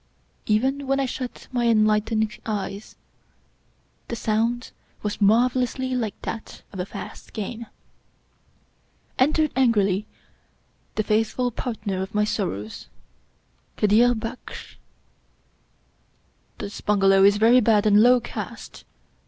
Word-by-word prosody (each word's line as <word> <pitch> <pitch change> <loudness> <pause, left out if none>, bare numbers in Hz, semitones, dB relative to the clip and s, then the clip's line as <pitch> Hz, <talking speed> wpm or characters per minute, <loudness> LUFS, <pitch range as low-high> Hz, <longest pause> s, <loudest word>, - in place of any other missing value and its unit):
Even 265 +6 +1
when 275 +1 +1
I 270 - +1
shut 255 0 -6
my 240 -2 +1
enlightened 215 -1 +2
eyes 205 -1 -5 1.1
the 235 - -4
sound 230 +2 -1 0.3
was 210 0 -3
marvelously 250 +4 +2
like 225 -5 -2
that 225 - -6
of 190 - -7
a 180 - -3
fast - - -9
game. 225 +2 -5 1.5
Entered 305 +3 +3
angrily 210 -6 +2 0.9
the 215 - 0
faithful 225 +4 0
partner 215 -6 -4
of 190 +2 -6
my 210 - +3
sorrows, 110 - -3 0.9
Kadir 230 +4 +4
Baksh. 230 +3 -8 0.9
" - - -41
This 200 - -7
bungalow 195 -2 +4
is 200 +1 +6
very 230 +4 +6
bad 215 -2 +3
and 210 0 +6
low 250 +2 +6
caste 235 - -8
220 Hz, 110 wpm, -24 LUFS, 210-245 Hz, 1.5 s, is